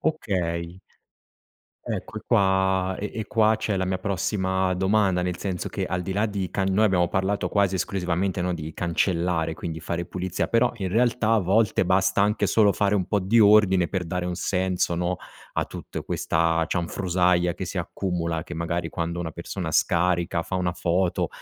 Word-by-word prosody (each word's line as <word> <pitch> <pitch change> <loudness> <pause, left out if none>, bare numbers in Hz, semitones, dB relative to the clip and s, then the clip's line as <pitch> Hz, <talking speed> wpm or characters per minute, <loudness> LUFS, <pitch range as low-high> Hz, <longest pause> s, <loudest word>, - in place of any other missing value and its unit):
Okay. 90 - -2 1.1
Ecco, - - -5
e 110 - -5
qua 95 -3 +2
e 105 - -4
e 110 -2 -4
qua 110 -3 +3
c'è 110 -2 -2
la 95 - 0
mia 95 0 -1
prossima 95 -1 0
domanda, 95 0 +2
nel 90 -1 -2
senso 90 -2 -3
che, - - -3
al 90 0 -2
di 90 +2 -4
là 105 +2 +2
di 100 -4 -2
can 95 -1 0
noi 110 +3 +4
abbiamo 90 -3 +2
parlato 95 +3 -1
quasi 100 -2 +2
esclusivamente, 95 0 -1
no, 90 0 0
di 80 -1 -6
cancellare, 85 0 0
quindi 80 0 -6
fare 85 +2 -3
pulizia, 95 0 -3
però 120 +1 +2
in 95 -4 -3
realtà 115 +2 +2
a - - +4
volte 100 +1 +2
basta 95 +2 +2
anche 105 +2 +1
solo 105 -3 +4
fare 100 0 +1
un 95 -3 +1
po' 105 - 0
di 100 +5 +2
ordine 100 -4 +5
per 95 -1 -3
dare 90 +1 -2
un 90 0 -2
senso, 90 -1 0
no, 90 +1 -1 0.4
a - - +1
tutte - - -7
questa 80 0 +1
cianfrusaglia 90 0 +1
che 95 +1 -6
si 90 - -6
accumula, 85 -2 -2
che 85 - -8
magari 85 +1 -2
quando 85 +1 -3
una 80 -2 -3
persona 85 +1 -5
scarica, 85 +1 +1
fa 85 +3 -6
1 90 -1 0
foto, 90 +1 0
95 Hz, 180 wpm, -25 LUFS, 85-100 Hz, 1.1 s, ordine